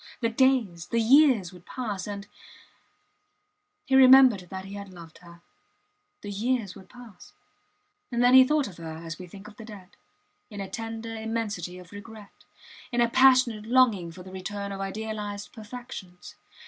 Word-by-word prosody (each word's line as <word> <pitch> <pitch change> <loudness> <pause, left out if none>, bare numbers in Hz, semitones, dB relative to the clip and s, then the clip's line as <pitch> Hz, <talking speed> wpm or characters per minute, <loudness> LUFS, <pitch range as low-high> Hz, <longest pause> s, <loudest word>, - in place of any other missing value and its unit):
The 230 - 0
days, 230 -9 +1
the 235 - 0
years 235 - +4
would 180 -1 -15
pass, 210 -7 -5
and... 200 -1 -6 1.6
He 270 - -3
remembered 260 -7 +7
that 190 0 -7
he 195 - -10
had 200 -1 -8
loved 170 -3 -13
her. 170 -1 -16 0.8
The 205 - -7
years 220 -1 -1
would 190 -1 -15
pass... 245 -5 -15 0.8
And 240 0 +1
then 245 +1 +5
he 260 0 +10
thought 295 +1 +1
of 185 - -12
her 160 -1 -7
as 165 +2 -7
we 180 - -9
think 195 +3 -12
of 210 -1 -15
the 225 - -10
dead 205 -5 -12 0.6
in 205 -3 -9
a 195 - -4
tender 225 +1 -6
immensity 220 -5 -4
of 180 -1 -14
regret, 205 0 -13 0.5
in 240 - -1
a 235 -1 +3
passionate 255 -4 +4
longing 230 -9 +3
for 180 +2 -12
the 185 - -12
return 200 +2 -6
of 195 0 -6
idealized 205 0 -5
perfections. 220 -5 -10
210 Hz, 165 wpm, -26 LUFS, 190-240 Hz, 1.6 s, he